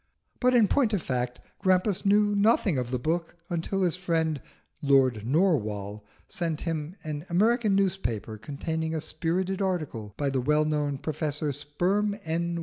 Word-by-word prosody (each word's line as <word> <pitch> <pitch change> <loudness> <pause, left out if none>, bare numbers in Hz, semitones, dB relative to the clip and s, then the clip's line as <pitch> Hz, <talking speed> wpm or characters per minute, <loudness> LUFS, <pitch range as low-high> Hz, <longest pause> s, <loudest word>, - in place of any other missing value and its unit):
But 250 0 +3
in 225 -4 +6
point 240 -3 +2
of 200 - +1
fact 125 -1 -2 0.2
Grampus 190 +1 +2
knew 205 +1 +4
nothing 205 - +3
of 125 -1 -3
the 125 - 0
book 165 +7 -2 0.2
until 175 +3 -1
his 175 -1 +1
friend 160 -5 0 0.4
Lord 130 -6 +3
Narwhal 110 - +1 0.2
sent 170 -6 -3
him 165 0 -3
an 150 -1 -4
American 215 +3 +3
newspaper 145 - -1
containing 160 +6 -3
a - - 0
spirited 185 +5 -2
article 150 - -2
by 140 -2 0
the 130 -1 0
well 150 +4 +2
known 150 -2 0
Professor 150 0 -2
Sperm 180 +9 0
N. 170 +1 -1
160 Hz, 150 wpm, -27 LUFS, 140-190 Hz, 0.4 s, in